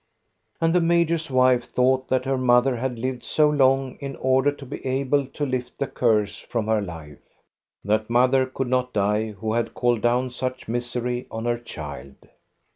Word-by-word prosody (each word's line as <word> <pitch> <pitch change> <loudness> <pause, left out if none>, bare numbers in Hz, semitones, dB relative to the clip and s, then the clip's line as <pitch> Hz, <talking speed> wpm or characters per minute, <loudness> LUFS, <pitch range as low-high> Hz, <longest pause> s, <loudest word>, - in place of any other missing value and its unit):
And 165 0 +2
the 180 - +4
major's 170 -1 +1
wife 130 -1 +3
thought 130 +2 +1
that 130 0 0
her 135 0 +1
mother 125 +1 +3
had 125 0 -3
lived 125 +1 -3
so 155 -1 +3
long 135 -2 +2
in 140 -2 -6
order 130 +2 +2
to 145 -1 -11
be 135 - -8
able 135 +1 0
to 145 +2 -4
lift 125 -2 -4
the 140 - -1
curse 105 -5 0
from 115 -3 -3
her 110 -1 +1
life. 80 -6 -8 0.7
That 110 +2 0
mother 130 +2 +3
could 130 0 -3
not 125 0 0
die 105 +1 0
who 110 +2 -3
had 120 0 -1
called 120 -2 +1
down 125 +2 +1
such 130 +1 -4
misery 120 +1 -3
on 115 +1 -5
her 120 0 0
child. 70 - -8
125 Hz, 180 wpm, -24 LUFS, 115-130 Hz, 0.7 s, the